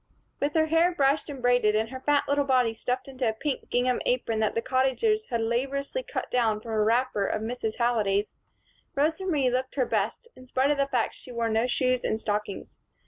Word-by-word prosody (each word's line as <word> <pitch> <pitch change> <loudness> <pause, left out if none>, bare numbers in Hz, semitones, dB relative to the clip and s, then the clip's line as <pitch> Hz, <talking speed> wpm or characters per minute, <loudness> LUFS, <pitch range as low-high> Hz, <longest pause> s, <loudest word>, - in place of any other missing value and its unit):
With 290 +2 -1
her 315 -1 +4
hair 330 +3 +3
brushed 285 -2 +1
and 270 -3 -7
braided 245 -4 +3
and 220 +1 0
her 260 +1 -7
fat 290 +2 +2
little 285 0 +2
body 255 -4 +2
stuffed 250 +3 -3
into 260 -3 -1
a - - -1
pink 270 +5 -4
gingham 250 0 +1
apron 245 -3 0
that 215 -1 0
the 230 - +1
Cottagers 270 - +1
had 235 -3 -1
laboriously 275 - -1
cut - - -5
down 225 -4 +2
from 225 +1 -8
a 215 -1 +1
wrapper 225 -2 +1
of 215 - -2
Mrs. 225 -1 -3
Halliday's, 215 -4 +1 0.6
Rosa 315 +7 0
Marie 280 -8 +2
looked 255 +1 -2
her 260 -3 +2
best, 220 - -2
in 255 - -15
spite 260 +3 +2
of 295 - +1
the 275 0 +1
fact 245 -4 0
that - - -14
she 255 - -12
wore 235 -1 -1
no 225 +2 +1
shoes 255 0 +1
and 220 - -1
stockings. 210 -2 -4
250 Hz, 215 wpm, -27 LUFS, 225-275 Hz, 0.6 s, her